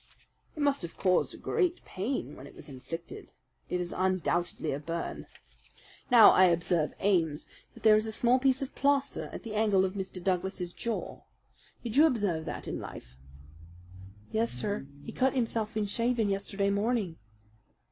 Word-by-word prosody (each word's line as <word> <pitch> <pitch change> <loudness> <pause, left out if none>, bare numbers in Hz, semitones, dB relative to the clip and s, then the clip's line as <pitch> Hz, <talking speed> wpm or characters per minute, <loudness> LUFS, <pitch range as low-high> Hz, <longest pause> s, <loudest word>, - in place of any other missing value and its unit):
"It 300 - -2
must 285 -1 +2
have 170 -2 -7
caused 185 -2 +1
great 360 -5 0
pain 190 - -3
when 135 - -11
it - - -15
was - - -10
inflicted. 165 - -8 0.4
It 180 - -1
is 175 -1 -3
undoubtedly 175 -3 0
a 140 - -2
burn. 165 +3 -5 0.8
Now, 235 -3 +9
I 185 - +6
observe, 170 -2 +1
Ames, 165 -7 +1 0.3
that - - -15
there 215 -1 +7
is 215 +1 +1
a - - -2
small 240 +3 +3
piece 265 0 +2
of 270 - -7
plaster 280 0 +1
at - - -8
the 225 -3 -6
angle 210 -3 +3
of 185 - -3
Mr. 190 -2 -5
Douglas's 185 -1 -1
jaw. 235 -1 -4 0.6
Did 235 +1 -3
you 310 +2 +8
observe 200 - 0
that - - -6
in - - -3
life?" - - -9 1.2
"Yes, 115 +1 +1
sir, 135 +5 -3 0.2
he - - -7
cut 265 +1 +1
himself 225 -3 -1
in 215 - +1
shaving 230 0 0
yesterday 200 0 0
morning." 205 -4 0
200 Hz, 165 wpm, -30 LUFS, 175-235 Hz, 1.2 s, Now